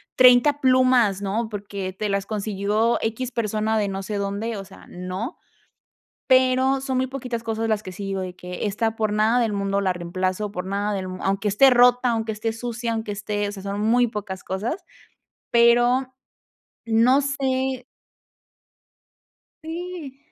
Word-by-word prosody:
30 255 Hz, +3 st, +6 dB
plumas", 255 Hz, -6 st, +4 dB
¿no?, 220 Hz, +3 st, -2 dB
porque 200 Hz, -2 st, -5 dB
te 210 Hz, +2 st, -3 dB
las 200 Hz, 0 st, -1 dB
consiguió, 210 Hz, +2 st, 0 dB
equis, 235 Hz, +3 st, -2 dB
persona 220 Hz, -1 st, 0 dB
de, 205 Hz, -2 st, 0 dB
no 195 Hz, 0 st, -4 dB
sé, 210 Hz, +2 st, -4 dB
dónde, 200 Hz, +3 st, -2 dB
o 195 Hz, -, -6 dB
sea, 195 Hz, -, -15 dB
no. 185 Hz, -, -5 dB, 0.9 s
Pero 260 Hz, +1 st, +3 dB
son 265 Hz, -2 st, -2 dB
muy 260 Hz, -, +2 dB
poquitas 250 Hz, -3 st, -5 dB
cosas 225 Hz, 0 st, -2 dB
las 215 Hz, -1 st, 0 dB
que 185 Hz, -, -7 dB
sí 200 Hz, +2 st, -7 dB
digo 195 Hz, -1 st, -2 dB
de 180 Hz, -1 st, -6 dB
que: 180 Hz, +3 st, -6 dB
"Esta 225 Hz, +2 st, -1 dB
por 215 Hz, -2 st, -1 dB
nada 220 Hz, +3 st, +3 dB
del 220 Hz, -3 st, 0 dB
mundo 200 Hz, 0 st, 0 dB
la 185 Hz, -2 st, +1 dB
reemplazo, 185 Hz, +4 st, -2 dB
por 180 Hz, -3 st, -5 dB
nada 200 Hz, +2 st, -1 dB
del 190 Hz, -1 st, -3 dB
mundo, 185 Hz, -, -7 dB
aunque 195 Hz, +2 st, 0 dB
esté 265 Hz, +7 st, +6 dB
rota, 245 Hz, 0 st, +5 dB
aunque 225 Hz, -1 st, -1 dB
esté 220 Hz, +1 st, -3 dB
sucia, 235 Hz, 0 st, -3 dB
aunque 220 Hz, -2 st, -3 dB
esté", 205 Hz, 0 st, -2 dB
o -, -, -5 dB
sea, 195 Hz, -, -8 dB
son 200 Hz, +1 st, -3 dB
muy 240 Hz, +3 st, +3 dB
pocas 200 Hz, -4 st, -6 dB
cosas, 230 Hz, -, -3 dB, 0.7 s
pero, 240 Hz, +2 st, +4 dB, 0.7 s
no 235 Hz, +5 st, +4 dB
sé 265 Hz, -2 st, -1 dB, 1.8 s
¡Sí! 325 Hz, -4 st, -7 dB
220 Hz, 165 wpm, -23 LUFS, 200-250 Hz, 1.8 s, 30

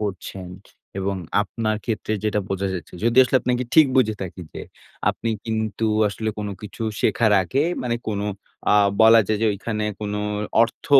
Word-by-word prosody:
করছেন। 95 Hz, -2 st, -5 dB, 0.5 s
এবং 95 Hz, 0 st, -1 dB, 0.3 s
আপনার 110 Hz, +1 st, -2 dB
ক্ষেত্রে 110 Hz, -2 st, -2 dB
যেটা 105 Hz, -1 st, +1 dB
বোঝা 95 Hz, 0 st, -1 dB
যাচ্ছে 90 Hz, -, -7 dB
যদি 120 Hz, +1 st, +2 dB
আসলে 130 Hz, +1 st, +2 dB
আপনাকে 125 Hz, +1 st, 0 dB
ঠিক 155 Hz, -3 st, +8 dB
বুঝে 110 Hz, -4 st, +3 dB
থাকি। 90 Hz, 0 st, -7 dB
যে -, -, -7 dB, 0.5 s
আপনি 115 Hz, -, -4 dB
কিন্তু 110 Hz, -1 st, -2 dB, 0.2 s
আসলে 110 Hz, +2 st, -4 dB
কোন 105 Hz, -1 st, -3 dB
কিছু 105 Hz, +2 st, -7 dB, 0.2 s
শেখার 110 Hz, -3 st, +3 dB
আগে 135 Hz, -, 0 dB, 0.2 s
মানে 120 Hz, -2 st, -1 dB
কোন 100 Hz, -1 st, -2 dB, 0.5 s
আ -, -, +6 dB, 0.3 s
বলা 115 Hz, 0 st, +8 dB
যায় 110 Hz, -1 st, 0 dB
যে, -, -, +4 dB
ওইখানে 105 Hz, +1 st, -3 dB, 0.2 s
কোনো 105 Hz, 0 st, -3 dB, 0.4 s
অর্থ 115 Hz, -, -3 dB
110 Hz, 165 wpm, -23 LUFS, 100-115 Hz, 0.5 s, ঠিক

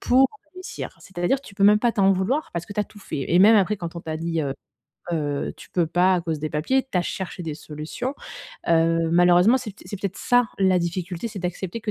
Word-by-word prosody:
pour 260 Hz, +2 st, +5 dB, 0.3 s
réussir. 370 Hz, 0 st, -7 dB
C'est-à-dire 190 Hz, +8 st, -1 dB
tu 200 Hz, -, -13 dB
peux 200 Hz, 0 st, +2 dB
même 210 Hz, +1 st, +7 dB
pas 240 Hz, +1 st, +1 dB
t'en 195 Hz, -3 st, +4 dB
vouloir 220 Hz, +12 st, 0 dB
parce 170 Hz, 0 st, -3 dB
que 205 Hz, -, -9 dB
tu 210 Hz, -, -1 dB
as 210 Hz, -, 0 dB
tout 210 Hz, -, -16 dB
fait 155 Hz, -8 st, -5 dB
et 175 Hz, -, +4 dB
même 215 Hz, +4 st, +7 dB
après 205 Hz, +1 st, +2 dB
quand 170 Hz, -3 st, -6 dB
on -, -, -5 dB
t'a 160 Hz, -1 st, -4 dB
dit, 165 Hz, 0 st, -2 dB
heu, 140 Hz, -2 st, -2 dB, 0.6 s
heu: 145 Hz, -3 st, -2 dB
«Tu -, -, -13 dB
peux 170 Hz, -3 st, +1 dB
pas 180 Hz, +3 st, +3 dB
à -, -, +1 dB
cause 165 Hz, -2 st, -2 dB
des 155 Hz, +1 st, -3 dB
papiers» 260 Hz, -, +1 dB
tu -, -, +1 dB
as -, -, +3 dB
cherché 185 Hz, +1 st, -5 dB
des 160 Hz, -3 st, -4 dB
solutions. 155 Hz, -, -5 dB, 0.6 s
Heu, 165 Hz, 0 st, +3 dB
malheureusement 175 Hz, +7 st, +5 dB
c'est 235 Hz, -5 st, -7 dB
pt 195 Hz, -, -17 dB
c'est 205 Hz, -, -5 dB
peut-être 195 Hz, -2 st, -3 dB
ça, 245 Hz, 0 st, +3 dB, 0.2 s
la 190 Hz, -1 st, +4 dB
difficulté. 175 Hz, +2 st, -3 dB
C'est 205 Hz, -4 st, -6 dB
d'accepter 180 Hz, +4 st, -4 dB
que 210 Hz, -1 st, -3 dB
180 Hz, 240 wpm, -24 LUFS, 165-210 Hz, 0.6 s, même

